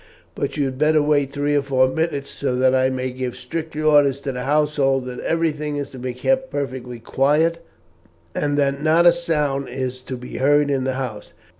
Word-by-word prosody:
"But - - -3
you 145 - +1
had 130 -1 -4
better 155 +1 +4
wait 145 -2 +2
three 145 +1 0
or 145 - +3
four 130 -2 +2
minutes 145 0 -2
so 135 -3 -2
that 130 +1 +3
I 130 0 +3
may 130 0 -3
give 125 -1 -4
strict 160 -1 -6
orders 145 -3 +3
to 140 - -3
the 125 0 -5
household 145 -2 +1
that 125 -1 -6
everything 150 -3 -1
is 145 -1 -4
to 130 - -10
be 125 0 -4
kept 265 - 0
perfectly 130 -3 -4
quiet, 155 +8 +1 0.7
and 145 -1 -1
that 140 -1 +1
not 160 +3 +4
a 175 - +8
sound 150 -5 -1
is 130 0 -4
to 130 0 -6
be 125 +1 -8
heard 145 +1 +3
in 135 -2 0
the 130 - 0
house. 125 -5 -5
140 Hz, 200 wpm, -21 LUFS, 130-150 Hz, 0.7 s, a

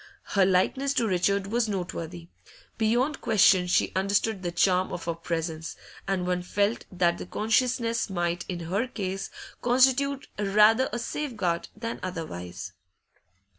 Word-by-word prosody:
Her 195 -2 +4
likeness 265 +9 +1
to 230 - +2
Richard 195 +1 +1
was 225 +2 0
noteworthy; 175 -3 -5 0.5
beyond 245 +6 +1
question 195 -4 +4
she 175 - +2
understood 200 +2 +1
the 175 -2 -2
charm 180 +1 +2
of 175 - -5
her 170 - -1
presence, 165 -1 -4 0.3
and 190 -2 0
one 180 0 0
felt 205 +5 0
that 175 -2 +1
the - - -7
consciousness 230 +2 +1
might, 175 -2 -1
in 175 -2 -3
her 195 +9 -1
case, 195 -4 -4 0.3
constitute 265 +3 +3
rather 210 +5 +4
a - - -2
safeguard 225 - -2
than 230 +2 -5
otherwise. 95 - -6
195 Hz, 135 wpm, -27 LUFS, 175-230 Hz, 0.5 s, Her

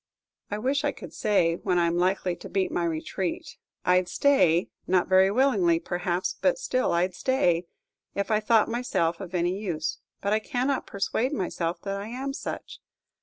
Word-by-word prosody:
I 205 - -2
wish 270 +6 0
I 290 - +1
could - - -11
say 170 -5 +2
when 180 - 0
I 170 - +3
am 170 0 +1
likely 185 0 +1
to - - -10
beat 190 -1 0
my 175 - 0
retreat. 170 +2 -3 0.3
I 180 +1 +5
'd 180 - -10
stay 180 - +3 0.2
not 180 -1 +2
very 190 0 +5
willingly, 280 - +3
perhaps, 175 - -2
but - - +3
still 255 - 0
I 170 +1 +3
'd 185 - -7
stay 180 -7 +1 0.5
if 200 +2 -1
I 215 - +4
thought 220 0 +3
myself 230 -9 -1
of 185 -1 -6
any 175 +1 +1
use; 165 -6 -3 0.2
but 200 +1 0
I 215 - +3
cannot 255 +4 -1
persuade 225 +7 -1
myself 175 - -2
that 200 0 -3
I 205 - -6
am 265 +4 -4
such. - - -6
195 Hz, 185 wpm, -27 LUFS, 175-250 Hz, 0.5 s, I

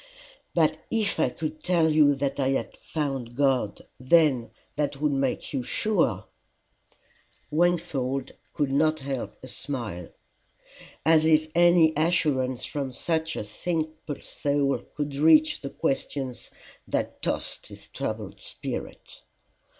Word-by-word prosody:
"But - - +3
if 220 -3 0
I - - +3
could 155 +4 -5
tell 175 -3 +3
you 150 -3 +5
I 140 -1 0
had 135 - -1
found 135 -6 -4
God, 130 -6 +1
then 130 -3 +4 0.3
that 145 -1 -1
would 150 0 +2
make 135 0 -1
you 135 - 0
sure." 210 - 0 1.3
Wingfold 150 -6 0 0.2
could 145 -3 0
not 155 +2 +2
help 135 -2 -4
a - - -7
smile: 120 - -5 1.0
as 160 -1 +5
if 155 0 +3
any 175 -2 +5
assurance 145 -6 +1
from 140 -3 -3
such 160 +4 -1
a - - -3
simple 155 +6 -4
soul 140 -1 0 0.2
could 145 -2 -3
reach 155 +1 +5
the 140 - -4
questions 135 -2 -3 0.4
that - - -2
tossed - - -1
his - - -12
troubled - - -5
spirit! - - -7
145 Hz, 120 wpm, -26 LUFS, 135-160 Hz, 1.3 s, you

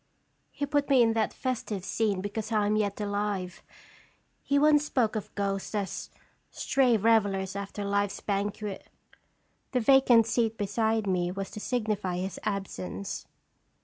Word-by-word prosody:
He 290 - -3
put 290 0 0
me 260 -3 +6
in 225 -1 +3
that 225 -1 +1
festive 220 -7 -3
scene 205 -4 0
because 210 +2 -4
I 210 -2 +2
am 210 +1 +2
yet 205 -1 0
alive. 205 -3 -2 0.8
He 285 - +1
once 295 0 +5
spoke 245 -7 0
of 215 - -5
ghosts 195 +1 -2
as 200 -2 -3 0.4
stray 255 -4 +2
revelers 200 -3 +2
after 200 +1 -5
life's 200 0 0
banquet. 205 0 -3 0.9
The 250 - +3
vacant 245 -2 +6
seat 225 0 0
beside 220 +2 0
me 180 -2 0
was 195 +1 -5
to - - -7
signify 210 -6 -1
his 185 +1 -4
absence. 100 - -4
210 Hz, 145 wpm, -28 LUFS, 195-230 Hz, 0.9 s, me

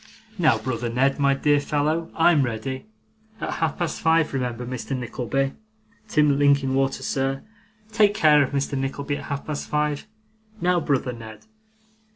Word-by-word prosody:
Now, 150 -9 +4
brother 120 +1 -3
Ned, 135 +4 +1
my 140 -1 +3
dear 145 +1 +3
fellow, 155 +3 -1
I'm 165 -2 +4
ready. 130 - -3 0.5
At - - -3
half 160 -3 -1
past 175 -2 -3
five, 160 -2 +3
remember, 125 -2 -2
Mr. 130 +2 -4
Nickleby! 130 +2 -2 0.5
Tim 150 -7 +3
Linkinwater, 135 -1 +2
sir, 135 0 -1 0.5
take 210 -2 +3
care 150 -6 +5
of 140 - +1
Mr. 140 0 -2
Nickleby 140 +2 -2
at - - -8
half 140 -1 -4
past 150 -2 -4
five. 150 +3 -1 0.5
Now, 180 -1 +2
brother 135 -5 0
Ned. 115 -2 -11
140 Hz, 150 wpm, -24 LUFS, 130-150 Hz, 0.5 s, care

